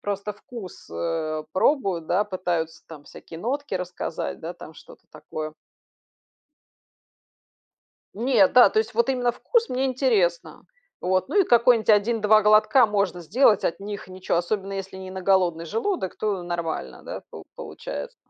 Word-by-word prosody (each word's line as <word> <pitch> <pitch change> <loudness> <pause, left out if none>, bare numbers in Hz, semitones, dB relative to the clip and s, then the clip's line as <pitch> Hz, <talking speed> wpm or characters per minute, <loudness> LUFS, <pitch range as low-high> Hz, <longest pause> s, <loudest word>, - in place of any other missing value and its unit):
просто 205 +1 -3
вкус, 205 -2 -11
э, 155 -2 -3
пробуют, 190 - +1
да, 200 +4 +2
пытаются 175 -4 -3
там 150 -3 -12
всякие 165 - -11
нотки 275 -1 -3
рассказать, 180 -2 -4
да, 165 +2 -5
там 160 -2 -12
что-то - - -16
такое. 155 0 -6 2.6
Нет, 230 -3 +3
да, 245 -5 +8
то - - +1
есть 220 +2 -1
вот 235 +4 +2
именно 245 -2 +1
вкус- 470 - 0
мне 260 +2 -1
интересно. 235 -10 0 0.4
Вот 185 0 0
ну 415 - +1
и - - +4
какой-нибудь 235 -4 +4
1-2 215 0 +4
глотка 215 +4 +5
можно 200 -4 -1
сделать. 215 - +3
От 170 - -1
них 205 -1 -7
ничё. 185 -2 -2
Особенно, 195 +3 -2
если 195 -1 -6
не 190 0 -8
на 190 0 -6
голодный 180 -3 +2
желудок, 225 - -2
то 200 -4 -2
нормально, 165 - -4
да, - - -7
по - - -10
получается. 70 - -7
195 Hz, 150 wpm, -24 LUFS, 175-230 Hz, 2.6 s, да